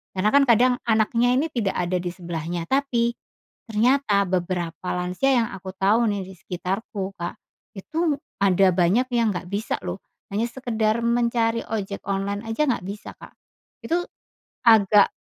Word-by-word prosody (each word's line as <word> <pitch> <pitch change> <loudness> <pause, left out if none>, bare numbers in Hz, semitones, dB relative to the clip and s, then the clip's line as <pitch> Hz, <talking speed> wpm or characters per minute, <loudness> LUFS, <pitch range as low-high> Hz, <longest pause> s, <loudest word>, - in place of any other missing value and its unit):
Karena 200 +3 +1
kan 280 - +7
kadang 245 +2 +5 0.2
anaknya 230 +3 +3
ini 285 - +2
tidak 210 -6 -1
ada 180 0 0
disebelahnya 175 -1 -4
tapi 240 -1 +1 0.6
ternyata 225 -2 +2
beberapa 180 -1 -2
lansia 180 +9 0
yang 225 - -1
aku 190 0 -8
tahu 220 +4 +3
nih 200 -2 -2
di 190 - -11
sekitarku 190 +2 -4
Kak, 170 -2 -6 0.4
itu 315 - -1 0.2
ada 195 -1 +4
banyak 185 +8 +3
yang 230 -2 +3
nggak 180 - -5
bisa 205 +3 -2
loh - - -4 0.3
hanya 225 +4 0
sekedar 230 -3 -1
mencari 235 -1 +1
ojek 200 -2 -3
online 200 +1 -1
aja 265 +7 +1
nggak 250 - 0
bisa, 200 +2 -7
Kak. - - -13 0.5
Itu 340 +2 +1 0.7
agak 210 -2 +6
210 Hz, 145 wpm, -24 LUFS, 185-235 Hz, 0.7 s, kan